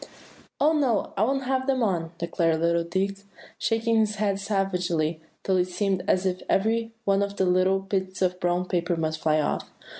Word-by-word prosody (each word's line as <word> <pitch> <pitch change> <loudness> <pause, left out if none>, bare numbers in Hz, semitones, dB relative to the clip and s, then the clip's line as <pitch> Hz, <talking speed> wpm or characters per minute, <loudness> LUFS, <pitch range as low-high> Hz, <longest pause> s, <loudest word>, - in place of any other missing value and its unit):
"Oh, 305 +2 +4
no! 265 -9 +1
I - - -1
won't 270 +4 +1
have 260 0 -1
them 260 -3 +2
on," 170 -6 -1
declared 165 -1 0
little 170 0 +2
Dick, 190 +3 -1 0.4
shaking 225 0 +1
his 215 -1 +1
head 200 -1 0
savagely, 180 -6 -1 0.2
till 190 -1 +2
it 180 0 +2
seemed 190 0 -1
as 185 +1 +2
if 185 -1 -1
every 225 +3 +1
one 195 0 +3
of 200 0 -2
the 190 - +2
small 185 +1 +3
bits 190 -1 -2
of 180 0 0
brown 175 0 0
paper 175 -1 0
must 160 -1 -2
fly 155 -1 +2
off. 150 - -1
190 Hz, 185 wpm, -26 LUFS, 175-210 Hz, 0.4 s, Oh